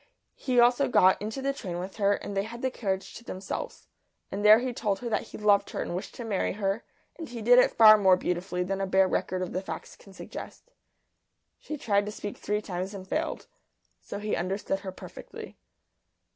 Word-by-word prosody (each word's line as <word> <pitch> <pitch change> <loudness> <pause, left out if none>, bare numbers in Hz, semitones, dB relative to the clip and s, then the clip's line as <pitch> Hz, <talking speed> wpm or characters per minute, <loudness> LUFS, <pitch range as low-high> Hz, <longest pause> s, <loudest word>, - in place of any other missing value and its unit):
He 255 -2 0
also 245 +3 +5
got 185 -6 +4
into 220 +6 -4
the 275 0 0
train 185 -10 -5
with 185 +2 -6
her, 200 -1 +3
and 200 - -7
they 195 - +2
had 235 +4 -8
the 260 - +1
carriage 195 -5 -3
to 235 - -10
themselves. 190 -4 -6 0.5
And 200 +1 -3
there 210 +1 +9
he 250 +1 -2
told 205 -4 -1
her 245 - -5
that 220 - -1
he - - -9
loved 205 -1 +3
her - - -4
and 175 - -5
wished 185 - -6
to 240 - -6
marry 210 -4 -1
her, 200 +2 -2 0.4
and 325 - -6
he 240 -1 -7
did 245 +3 +6
it - - +5
far 215 -1 +9
more 190 -2 +5
beautifully 180 0 -2
than 195 +2 -2
a 195 - -1
bare 190 0 +4
record 185 0 -1
of 180 - -5
the 185 - -1
facts 190 - -7
can 195 - -17
suggest. 345 - -10 0.9
She 305 - -6
tried 205 -5 +1
to - - -3
speak 205 -1 -6
three 210 +1 -2
times 185 +1 -4
and 190 -1 -8
failed. 315 +9 -2 0.5
So - - -7
he 210 +1 -2
understood 195 +2 -2
her 195 -1 -6
perfectly. - - -10
205 Hz, 215 wpm, -28 LUFS, 190-235 Hz, 0.9 s, there